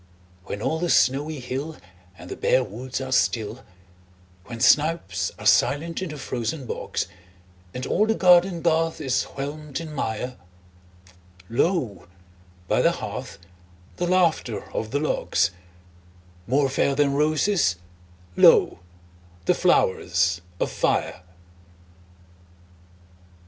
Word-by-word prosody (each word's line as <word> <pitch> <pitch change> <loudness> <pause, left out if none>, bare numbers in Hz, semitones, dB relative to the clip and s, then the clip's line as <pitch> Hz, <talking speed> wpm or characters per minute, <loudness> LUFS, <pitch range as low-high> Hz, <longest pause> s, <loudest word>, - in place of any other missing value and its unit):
When 100 - -5
all 160 - 0
the 175 0 -1
snowy 145 +3 +2
hill 135 +5 -5 0.4
And 90 - -11
the - - -4
bare 130 - +2
woods 125 +4 -6
are 130 -1 -5
still; 115 -1 0 0.8
When 115 -1 -8
snipes 130 - +2
are - - -10
silent 165 +5 +2
in 185 - -3
the 150 - -7
frozen 130 +2 -4
bogs, - - -3 0.7
And 125 +5 -5
all 215 - +1
the 225 - +2
garden 180 -2 +4
garth 165 -1 +1
is 130 -2 0
whelmed 145 +1 -5
in 160 -2 -7
mire, 125 -1 -3 1.1
Lo, 115 - 0 0.6
by - - +2
the - - +3
hearth, - - -6 0.6
the 175 - -1
laughter 165 - +1
of 110 - -3
the 145 - -1
logs— 145 - 0 1.0
More 135 +3 +2
fair 135 +1 +1
than 140 -1 +2
roses, 155 - +2 0.6
lo, - - +5 0.7
the - - +4
flowers 85 -1 +2 0.2
of - - -1
fire! - - -1
140 Hz, 120 wpm, -24 LUFS, 120-160 Hz, 1.1 s, lo